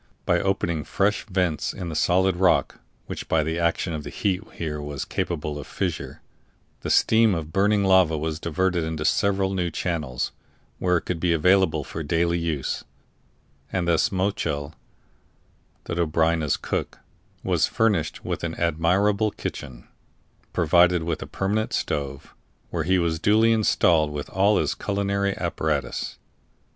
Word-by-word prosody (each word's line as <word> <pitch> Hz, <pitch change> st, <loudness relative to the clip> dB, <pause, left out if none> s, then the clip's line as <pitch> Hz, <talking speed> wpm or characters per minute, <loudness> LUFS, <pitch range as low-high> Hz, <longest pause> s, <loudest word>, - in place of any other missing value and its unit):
By -, -, +3 dB
opening 85 Hz, -5 st, 0 dB
fresh 105 Hz, +9 st, 0 dB
vents 90 Hz, -5 st, 0 dB
in 90 Hz, -3 st, -5 dB
the 80 Hz, -, -5 dB
solid 90 Hz, +4 st, +2 dB
rock 95 Hz, 0 st, +2 dB, 0.3 s
(which -, -, -6 dB
by 80 Hz, -1 st, +2 dB
the 80 Hz, +2 st, -2 dB
action 85 Hz, 0 st, 0 dB
of 75 Hz, -1 st, -4 dB
the -, -, -7 dB
heat 95 Hz, 0 st, -1 dB
was -, -, -20 dB
here 75 Hz, -3 st, -3 dB, 0.3 s
capable 75 Hz, -3 st, -3 dB
of 70 Hz, -, -8 dB
fissure) -, -, -4 dB, 0.6 s
the -, -, -5 dB
stream 110 Hz, -3 st, +4 dB
of 80 Hz, -1 st, -5 dB
burning 100 Hz, +1 st, +3 dB
lava 95 Hz, -4 st, +4 dB
was 80 Hz, +1 st, -3 dB
diverted 85 Hz, +2 st, 0 dB
into 80 Hz, -1 st, -3 dB
several 95 Hz, +1 st, +2 dB
new 90 Hz, -2 st, 0 dB
channels, 75 Hz, -8 st, -2 dB, 0.5 s
where 90 Hz, -1 st, +2 dB
it -, -, -4 dB
could 90 Hz, -3 st, -3 dB
be 85 Hz, 0 st, +2 dB
available 90 Hz, -1 st, +3 dB
for 80 Hz, -, -6 dB
daily 85 Hz, +3 st, +1 dB
use; 80 Hz, -5 st, -2 dB, 0.9 s
and 90 Hz, -2 st, -1 dB
thus 85 Hz, -2 st, +2 dB
Mochel, 90 Hz, -6 st, -1 dB, 1.1 s
the -, -, -5 dB
Dobryna's 80 Hz, -2 st, +1 dB
cook, -, -, -3 dB, 0.5 s
was -, -, +2 dB
furnished 105 Hz, -9 st, 0 dB
with -, -, -3 dB
an 80 Hz, -1 st, -3 dB
admirable 95 Hz, +6 st, +2 dB
kitchen, 60 Hz, -10 st, -7 dB, 0.6 s
provided 90 Hz, +1 st, +4 dB
with 85 Hz, -, -2 dB
a -, -, -6 dB
permanent 105 Hz, +3 st, -1 dB
stove, 70 Hz, -1 st, -3 dB, 0.4 s
where 80 Hz, -3 st, -2 dB
he 95 Hz, +2 st, +3 dB
was 85 Hz, -2 st, 0 dB
duly 110 Hz, +5 st, +4 dB
installed 90 Hz, -8 st, +3 dB
with 75 Hz, -1 st, -6 dB
all 100 Hz, +3 st, +3 dB
his -, -, +1 dB
culinary 100 Hz, -1 st, -1 dB
apparatus. 80 Hz, -6 st, -2 dB
85 Hz, 150 wpm, -24 LUFS, 80-95 Hz, 1.1 s, stream